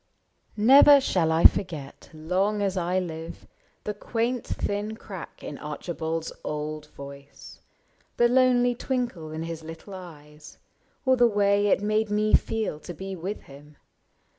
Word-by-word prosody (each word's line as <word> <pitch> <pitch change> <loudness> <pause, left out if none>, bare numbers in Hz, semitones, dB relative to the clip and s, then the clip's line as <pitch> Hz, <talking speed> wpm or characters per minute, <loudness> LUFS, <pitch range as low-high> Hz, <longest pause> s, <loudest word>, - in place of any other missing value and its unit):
Never 275 +6 +8
shall 180 -11 +1
I 160 +1 +2
forget, 155 -8 +2
long 185 +7 -1
as 195 -1 0
I 180 0 0
live. 165 -2 -5 0.4
The 210 - -3
quaint 230 +4 -2
thin 205 +2 -3
crack 190 -6 -10
in 145 - -7
Archibald's 160 +2 -4
old 150 0 -4
voice. 140 -1 -12 0.6
The 240 - +5
lonely 245 -1 +4
twinkle 240 - -3
in 160 +1 -4
his 165 -1 -6
little 165 +5 -10
eyes. 150 -5 -12 0.5
Or 260 0 +4
the 240 -1 +6
way 205 -1 +2
it 200 - +2
made 215 +1 +1
me 210 +1 +1
feel 220 -9 +1
to 175 +2 -9
be 190 +3 -6
with 185 +4 -5
him. 145 +2 -15
185 Hz, 140 wpm, -26 LUFS, 160-215 Hz, 0.6 s, Never